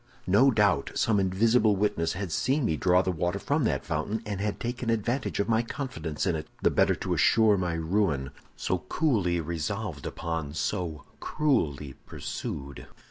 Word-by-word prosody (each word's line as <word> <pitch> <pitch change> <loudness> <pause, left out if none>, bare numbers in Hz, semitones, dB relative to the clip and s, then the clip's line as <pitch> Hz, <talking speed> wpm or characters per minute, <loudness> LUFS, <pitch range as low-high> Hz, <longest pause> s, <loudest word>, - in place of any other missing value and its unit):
"No 100 +9 +5
doubt 100 - +2
some 110 -3 +2
invisible 105 +3 +3
witness 90 -5 0
had 95 -2 -4
seen 135 - +1
me 80 - +1
draw 90 +3 +3
the 95 - 0
water 90 +2 -1
from 145 +6 0
that 70 -9 -1
fountain, 85 +8 -2
and 100 -2 -4
had 105 0 -2
taken 120 0 -3
advantage 115 +4 -1
of 100 - +1
my 115 0 +3
confidence 115 - -4
in 85 - +1
it, 75 - -5 0.2
the - - +4
better - - +3
to - - -2
assure 110 -2 +4
my 90 -3 -1
ruin, 80 -5 0 0.2
so 95 - -1
coolly 100 - +1
resolved 85 +1 -4
upon, 80 -3 -4
so 85 -3 -2 0.2
cruelly 75 - 0
pursued. 70 -1 -6
95 Hz, 165 wpm, -28 LUFS, 80-110 Hz, 0.2 s, No